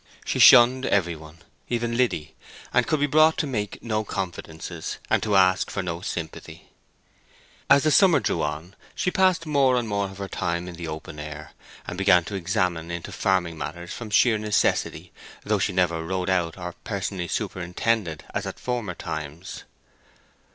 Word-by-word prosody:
She - - -1
shunned 125 +2 +7
every 85 -4 +1
one, 80 +1 -14 0.3
even 120 -1 -1
Liddy, 115 -11 0 0.4
and 125 0 +3
could 155 -3 +1
be 145 - +3
brought 155 +2 +4
to - - 0
make 105 -7 -4
no 110 -2 -1
confidences, 85 -4 -5
and - - +3
to 105 -2 0
ask 95 -1 +4
for 100 - -3
no 85 -1 -4
sympathy. 85 -4 -7 1.0
As 140 - +6
the 155 - +3
summer 175 -3 +6
drew 85 - -1
on 75 +5 -4 0.2
she 180 - 0
passed 185 -3 +2
more 140 -4 +3
of 100 -4 -2
her 100 0 -5
time 85 -1 -2
in 90 - -7
the 85 -1 -7
open 80 -1 -7
air, 75 0 -8 0.3
and 90 - -6
began 90 -3 +5
to 95 - -7
examine 85 -2 -1
into 85 -1 -5
farming 90 -4 0
matters 85 +3 -6
from 115 -3 -7
sheer 110 +1 +4
necessity, 105 -1 0 0.3
though 105 -1 0
she 100 - 0
never 85 -3 +1
rode 95 +2 -2
out 85 -3 0
or 90 -1 -6
personally 95 -3 -3
superintended 90 0 -2
as - - -2
at - - -7
former 120 -8 -3
times. 80 +4 -7
95 Hz, 165 wpm, -25 LUFS, 85-115 Hz, 1.0 s, shunned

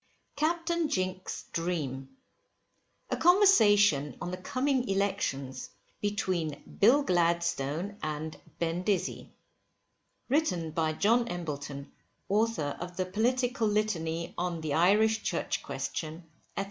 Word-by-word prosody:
CAPTAIN 335 +1 0
JINK'S 185 -2 -2
DREAM. 145 -6 -2 1.0
A - - +2
CONVERSATION 205 - +5
ON 180 0 -4
THE 180 - -4
COMING 255 +5 0
ELECTIONS 190 -10 -1 0.3
BETWEEN 185 -7 -2
BILL 255 +8 +6
GLADSTONE 170 - 0 0.5
& - - -34
BEN 170 +1 -1
DIZZY. 195 0 -1 1.0
Written 185 - +1
by 160 0 0
JOHN 230 +8 +3
EMBLETON, 145 -7 -5 0.4
Author 205 -8 +1
of 175 0 -7
the 185 - 0
"Political 240 +4 +1
Litany 170 -6 -1
on 175 -2 -2
the 155 -2 -2
Irish 215 +6 +4
Church - - -2
Question, 160 +2 -5 0.3
&c." - - +1
185 Hz, 110 wpm, -30 LUFS, 160-220 Hz, 1.0 s, BILL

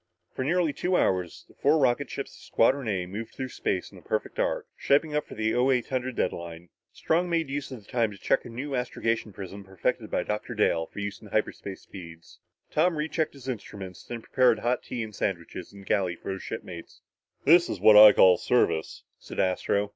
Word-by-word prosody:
For 130 - -3
nearly 165 +1 +1
two 180 +4 0
hours 90 -3 0
the - - -20
four 150 +3 +3
rocket 135 -1 +2
ships 140 - -5
of - - -16
Squadron 130 +2 +2
A 95 -4 -1
moved 105 +5 -7
through 130 -1 -4
space 90 -6 -2
in - - -13
a - - -18
perfect - - -3
arc, - - 0
shaping 150 +2 +2
up 150 - -1
for - - -10
the 110 0 0
0800 130 0 +1
deadline. 85 -2 -3 0.2
Strong 175 +2 0
made 165 -4 0
use 145 0 -3
of 120 -6 -9
the - - -17
time 120 -4 +2
to 105 - -11
check - - +1
a - - -9
new 135 +5 -5
astrogation 115 -3 -1
prism 100 +1 -8
perfected 95 -2 -2
by - - 0
Dr. 105 +3 -4
Dale 85 -6 +2
for - - -20
use 100 0 -4
at 105 - -13
hyperspace 100 -2 -2
speeds. 85 -3 -12 0.3
Tom 170 +3 +2
rechecked 155 +1 -1
his 135 -2 -12
instruments, 100 -6 -6
then 115 -2 -7
prepared 125 -3 +3
hot 120 +3 0
tea 120 -2 -4
and 110 -1 -8
sandwiches 90 -4 -4
in 100 - -12
the - - -15
galley 95 -4 +1
for 90 - -6
his 95 - -5
shipmates. 90 -6 -8 0.4
"This 170 +4 +6
is - - -3
what 110 - +7
I 105 0 +11
call 90 -3 +6
service," 80 - 0 0.2
said - - -8
Astro. 100 +2 +1
110 Hz, 205 wpm, -27 LUFS, 95-135 Hz, 0.4 s, I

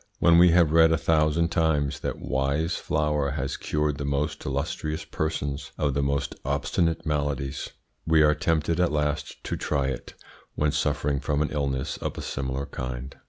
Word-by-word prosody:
When 85 0 +5
we 90 0 +8
have 85 -2 +4
read 80 0 +6
a 80 - +3
thousand 80 +1 +2
times 80 -4 +1
that - - -3
Y's 70 +5 -1
flour 75 -2 0
has 70 -2 -2
cured 75 -1 -1
the - - -2
most 70 +3 -1
illustrious 75 +3 -3
persons 70 -3 -3
of 70 -2 0
the 70 - 0
most 70 0 -1
obstinate 80 +5 0
maladies, 70 -3 -2 0.4
we 80 -1 +5
are 75 0 +5
tempted 80 +2 0
at 90 -3 +3
last 75 0 -2
to - - -3
try 70 -2 -1
it 65 - -6 0.4
when 75 0 +1
suffering 75 -1 0
from 75 +2 0
an 75 - -3
illness 70 -3 -2
of - - -4
a - - -5
similar 65 +1 -3
kind. 65 0 -6
75 Hz, 170 wpm, -26 LUFS, 70-80 Hz, 0.4 s, we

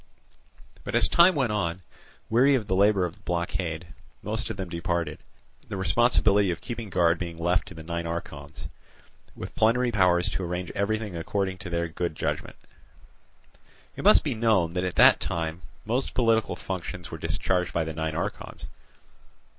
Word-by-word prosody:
But - - -4
as - - +5
time 175 +1 +5
went 130 -6 +1
on, 90 -4 -2 0.4
weary 130 +5 +4
of 120 -5 -1
the 95 - -1
labour 100 -1 +4
of 85 -1 -8
blockade, 85 -1 -2 0.4
most 110 +3 -2
of 110 - -5
them 95 -2 -4
departed; 85 -2 -2 0.5
the 100 - -4
responsibility 100 +1 +3
of 85 - -2
keeping 115 -3 -6
guard 85 -2 +2
being 85 -2 -5
left 85 +2 +1
to - - -10
the 80 - -9
nine 85 +1 -3
archons, 75 -3 -6 0.7
with - - -7
plenary 120 +3 +2
powers 90 -4 +3
to 95 - -3
arrange 90 +1 -3
everything 105 -1 -2
according 95 +2 -2
to 90 - -7
their 85 0 -1
good 85 0 -3
judgment. - - -3 1.4
It - - -6
must - - +6
be - - -1
known 110 -7 +2
that 90 0 -1
at 90 - -3
that - - +7
time 80 +1 -3 0.2
most 125 +5 -1
political 115 -3 +2
functions 90 -3 -6
were - - -6
discharged 90 -1 -1
by 85 - 0
the 80 0 -5
nine 80 0 -3
archons. 85 - -5
90 Hz, 165 wpm, -26 LUFS, 85-105 Hz, 1.4 s, that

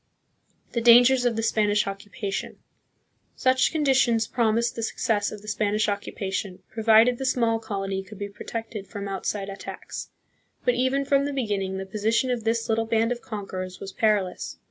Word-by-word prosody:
The 235 - -1
Dangers 245 +2 +7
of 240 -2 +2
the 225 - -1
Spanish 210 -2 +2
Occupation. 195 0 -5 0.8
Such 260 0 +3
condi 295 -4 +2
tions 235 -4 +3
promised 235 0 +1
the 230 - -4
success 215 -2 0
of 210 -1 -9
the - - -13
Spanish 210 0 +1
occupation, 200 -2 -3
pro 220 - -5
vided 225 +2 +6
the - - -3
small 230 -3 +2
colony 195 -3 -3
could 195 +2 -12
be 205 - -4
protected 215 0 -6
from 200 0 -6
outside 195 +1 -3
attacks. 195 0 -7 0.6
But 245 - +4
even 260 +3 +1
from 280 0 +3
the 285 - -2
beginning 200 -7 -1
the 190 - -4
position 220 +6 0
of 235 -3 -2
this 225 0 0
little 225 0 +1
band 225 +1 +1
of 240 -1 -3
conquerors 185 -4 -6
was 195 -1 -7
perilous. 205 -5 0
220 Hz, 170 wpm, -25 LUFS, 200-235 Hz, 0.8 s, Dangers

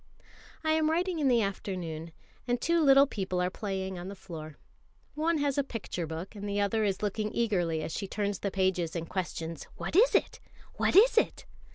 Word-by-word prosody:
I 315 - +2
am 315 0 +3
writing 350 +1 0
in 290 - +2
the 240 -3 +4
afternoon, 175 -5 -4 0.4
and 245 0 +1
two 335 +5 +2
little 275 -1 +7
people 190 -8 -3
are 180 0 0
playing 190 -2 -4
on 175 - -6
the 200 - -6
floor. 160 -5 -9 0.6
One 320 +2 +1
has 285 -1 0
a - - +3
picture 200 - -5
book, 165 +4 -6
and 205 -1 -6
the 200 0 -1
other 205 +2 +1
is 200 -1 -1
looking 210 +1 -1
eagerly 175 -9 +1
as - - -4
she 195 - -3
turns 205 -1 -2
the 200 - -1
pages 185 -4 0
and 165 -1 -3
questions: 165 -3 -4
"What - - -5
is 470 +6 +6
it? - - +1 0.4
What - - +1
is 455 +4 +7
it?" - - -2
200 Hz, 200 wpm, -30 LUFS, 180-275 Hz, 0.6 s, little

